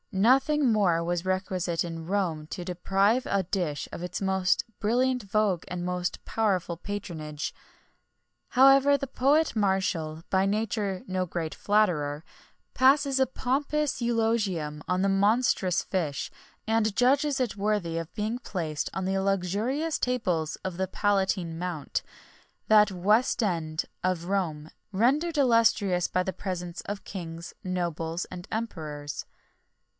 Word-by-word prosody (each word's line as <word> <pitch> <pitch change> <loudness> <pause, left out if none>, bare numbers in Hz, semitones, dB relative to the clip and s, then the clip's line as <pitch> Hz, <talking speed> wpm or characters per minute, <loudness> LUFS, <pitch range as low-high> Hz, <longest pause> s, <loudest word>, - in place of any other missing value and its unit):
Nothing 265 +7 +4
more 180 -6 +3
was 175 0 -1
requisite 185 -2 -1
in 165 -1 -6
Rome 175 -6 -1
to 175 +2 -6
deprive 195 +6 +1
a 200 -1 +1
dish 175 -5 -2
of - - -6
its 180 - -4
most 190 -1 +1
brilliant 250 +3 +1
vogue 200 -3 +1
and 175 -1 -4
most 180 0 -3
powerful 190 -6 0
patronage. 165 -6 -5 1.0
However, 275 +2 +6
the 275 - -4
poet 280 +4 +2
Martial, 190 -6 0
by 190 0 +3
nature 205 -2 -1
no 185 -1 -1
great 165 -2 -3
flatterer, 165 -8 +1 0.5
passes 275 +1 +4
a 265 - +4
pompous 280 +2 -1
eulogium 215 -10 0
on 180 0 +1
the - - +3
monstrous 200 -1 +2
fish,[XXI 160 -7 -2 0.3
35] 225 - +1
and 215 -2 +1
judges 275 +3 +3
it 245 -6 -1
worthy 200 -5 -1
of 165 0 -5
being 215 +3 -2
placed 165 - -3
on 190 - -2
the 190 +1 0
luxurious 200 - 0
tables 180 -11 0
of 185 -2 -3
the 190 0 0
Palatine 190 -4 0
Mount, 175 -5 -3 0.7
that 210 -1 +6
Westend 185 -5 +1 0.2
of 180 -2 0
Rome, 165 -5 -2 0.2
rendered 285 - +2
illustrious 225 -8 +3
by 185 - 0
the 190 - -3
presence 180 -2 -5
of 205 0 -6
kings, 170 -3 -7
nobles, 170 -2 -2
and 180 -1 -9
emperors. 150 - -4
190 Hz, 130 wpm, -27 LUFS, 175-225 Hz, 1.0 s, However